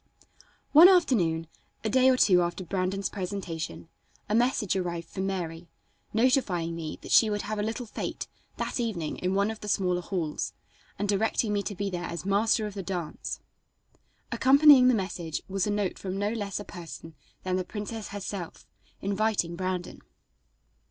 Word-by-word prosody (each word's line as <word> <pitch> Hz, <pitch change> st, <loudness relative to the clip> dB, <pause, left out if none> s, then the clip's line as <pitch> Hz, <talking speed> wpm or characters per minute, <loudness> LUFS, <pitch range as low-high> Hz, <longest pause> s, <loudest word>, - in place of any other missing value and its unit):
One 330 Hz, +5 st, +10 dB
afternoon, 195 Hz, -, +3 dB, 0.4 s
a 220 Hz, -, 0 dB
day 260 Hz, +3 st, +5 dB
or 255 Hz, -, +4 dB
two 180 Hz, -7 st, +5 dB
after 175 Hz, +2 st, -2 dB
Brandon's 190 Hz, +2 st, -1 dB
presentation, 180 Hz, -5 st, -5 dB, 0.4 s
a 210 Hz, -, -2 dB
message 235 Hz, -4 st, +2 dB
arrived 170 Hz, -3 st, -2 dB
from 190 Hz, 0 st, -3 dB
Mary, 170 Hz, -3 st, -4 dB, 0.4 s
notifying 215 Hz, -, +1 dB
me 160 Hz, -2 st, -5 dB
that -, -, -7 dB
she 220 Hz, -, +6 dB
would 205 Hz, -1 st, -2 dB
have 215 Hz, 0 st, -3 dB
a -, -, +1 dB
little 225 Hz, +4 st, -3 dB
fête 215 Hz, -, -5 dB, 0.3 s
that -, -, -2 dB
evening 195 Hz, -10 st, -2 dB
in 185 Hz, +1 st, -1 dB
one 200 Hz, +2 st, +2 dB
of 220 Hz, -, -8 dB
the 210 Hz, -, -8 dB
smaller 180 Hz, -3 st, +1 dB
halls 170 Hz, -4 st, -3 dB, 0.4 s
and 205 Hz, -, -1 dB
directing 210 Hz, +1 st, +1 dB
me 205 Hz, -, +1 dB
to 205 Hz, 0 st, -5 dB
be 200 Hz, +1 st, -2 dB
there 175 Hz, -1 st, -3 dB
as 170 Hz, +1 st, -5 dB
Master 215 Hz, +3 st, +2 dB
of 210 Hz, -, -5 dB
the 200 Hz, -, -4 dB
Dance. 180 Hz, -4 st, -4 dB, 0.9 s
Accompanying 275 Hz, -1 st, +7 dB
the 255 Hz, -, +5 dB
message 180 Hz, -5 st, -3 dB
was 195 Hz, +1 st, -1 dB
a -, -, 0 dB
note 205 Hz, -2 st, -1 dB
from 190 Hz, 0 st, -4 dB
no 205 Hz, +1 st, 0 dB
less 205 Hz, -4 st, -3 dB
a 205 Hz, -, -7 dB
person 165 Hz, -2 st, -9 dB, 0.3 s
than 185 Hz, 0 st, 0 dB
the 185 Hz, -, -1 dB
princess 210 Hz, +3 st, -6 dB
herself, 200 Hz, -3 st, -6 dB, 0.4 s
inviting 200 Hz, -3 st, 0 dB
Brandon. 185 Hz, 0 st, -3 dB
195 Hz, 170 wpm, -28 LUFS, 180-215 Hz, 0.9 s, One